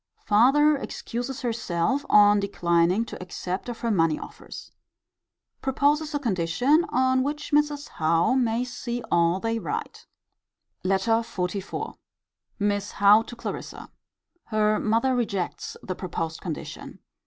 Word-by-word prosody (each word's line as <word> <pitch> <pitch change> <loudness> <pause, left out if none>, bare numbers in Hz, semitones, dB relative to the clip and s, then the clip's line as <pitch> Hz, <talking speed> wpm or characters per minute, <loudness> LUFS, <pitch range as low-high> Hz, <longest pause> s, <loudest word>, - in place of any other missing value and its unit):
Farther 275 +8 +5
excuses 245 -1 -5
herself 230 +2 -1
on 205 0 +6
declining 180 +1 +1
to - - -9
accept 185 +3 -5
of 240 - -7
her 235 - 0
money 165 -5 +2
offers. - - -10 0.9
Proposes 295 +3 +1
a - - +1
condition 245 - +2
on 260 +1 +2
which 295 +2 -3
Mrs. 295 -1 +1
Howe 165 +6 +1
may 240 -2 +1
see 245 -1 -5
all 170 +1 +3
they 225 +2 -1
write. 440 - -5 0.8
LETTER 195 +4 +1
XLIV. 190 -2 -4 0.6
Miss 205 -1 -1
Howe 205 +2 +6
to 240 - -9
Clarissa. 235 - -7 0.5
Her 215 -1 +1
mother 230 +4 +1
rejects 200 -7 -3
the 185 - -3
proposed 165 -3 -4
condition. 165 -5 -7
225 Hz, 120 wpm, -25 LUFS, 185-260 Hz, 0.9 s, on